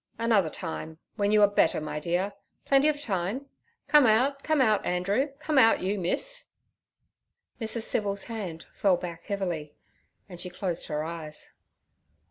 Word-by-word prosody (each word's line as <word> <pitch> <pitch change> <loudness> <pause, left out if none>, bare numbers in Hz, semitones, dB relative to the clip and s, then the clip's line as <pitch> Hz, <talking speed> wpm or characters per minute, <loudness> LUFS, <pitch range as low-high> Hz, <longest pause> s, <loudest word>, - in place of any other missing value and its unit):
'Another 225 -7 +2
time, 160 -1 -6 0.2
when 205 -1 +1
you 210 -1 +5
are - - +8
better, 200 -5 +2
my 150 0 -4
dear; 175 +5 -1 0.3
plenty 275 +2 +4
of 300 -1 +1
time. 210 +1 -2 0.4
Come 295 -3 +6
out—come 275 +7 +2
out, 220 -5 +3
Andrew; 195 +10 0
come 305 -1 +2
out, 225 -3 +5
you, 200 +2 0
miss.' - - -1 1.1
Mrs. 225 0 -1
Civil's 200 -2 0
hand 195 -8 -6
fell 190 -3 +3
back 170 -1 -7
heavily, 175 -8 -3 0.5
and 175 -2 -10
she 180 - -5
closed 180 -1 -3
her 150 -1 -2
eyes. 160 -2 -6
200 Hz, 145 wpm, -28 LUFS, 170-230 Hz, 1.1 s, are